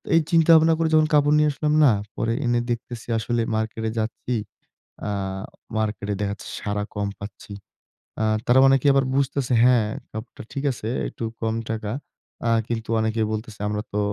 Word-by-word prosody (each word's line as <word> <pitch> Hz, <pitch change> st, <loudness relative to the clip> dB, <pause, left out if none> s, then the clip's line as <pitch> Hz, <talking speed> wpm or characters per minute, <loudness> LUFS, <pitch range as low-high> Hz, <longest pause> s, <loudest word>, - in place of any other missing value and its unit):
এই 165 Hz, -, +6 dB
চিন্তা-ভাবনা 165 Hz, -1 st, +6 dB
করে 165 Hz, -, +2 dB
যখন 155 Hz, 0 st, +5 dB
কাপড় 145 Hz, 0 st, +5 dB
নিয়ে 150 Hz, 0 st, +4 dB
আসলাম 150 Hz, +2 st, 0 dB
না, 135 Hz, -, +7 dB, 0.2 s
পরে 115 Hz, 0 st, 0 dB
এনে 120 Hz, 0 st, +2 dB
দেখতেছি, 120 Hz, 0 st, -5 dB
আসলে 120 Hz, +2 st, -1 dB
মার্কেটে 110 Hz, 0 st, -2 dB
যাচ্ছি 115 Hz, +2 st, -3 dB, 0.7 s
আ -, -, -1 dB, 0.7 s
মার্কেটে 105 Hz, -1 st, -2 dB
দেখা 100 Hz, -1 st, -1 dB
যাচ্ছে 100 Hz, -, -10 dB
সাড়া 105 Hz, 0 st, -2 dB
কম 105 Hz, -1 st, -1 dB
পাচ্ছি। 100 Hz, 0 st, -9 dB, 0.7 s
আ -, -, +2 dB, 0.2 s
তারা 125 Hz, +2 st, +5 dB
অনেকে 135 Hz, 0 st, +3 dB
আবার 135 Hz, -1 st, +3 dB
বুঝতেছে 135 Hz, -2 st, 0 dB
হ্যাঁ, 120 Hz, -3 st, +5 dB, 0.2 s
কাপড়টা 110 Hz, +2 st, -8 dB
ঠিক 140 Hz, -, -3 dB
আছে, 115 Hz, -3 st, -5 dB, 0.2 s
একটু -, -, -7 dB, 0.2 s
কম 110 Hz, 0 st, 0 dB
টাকা। 110 Hz, -2 st, -3 dB, 0.6 s
আ -, -, +3 dB, 0.2 s
কিন্তু 115 Hz, -1 st, -3 dB
অনেকে 110 Hz, 0 st, 0 dB
বলতেছে, 110 Hz, 0 st, -5 dB
"আমরা 105 Hz, 0 st, -1 dB
তো 105 Hz, -, 0 dB
115 Hz, 165 wpm, -24 LUFS, 110-135 Hz, 0.7 s, না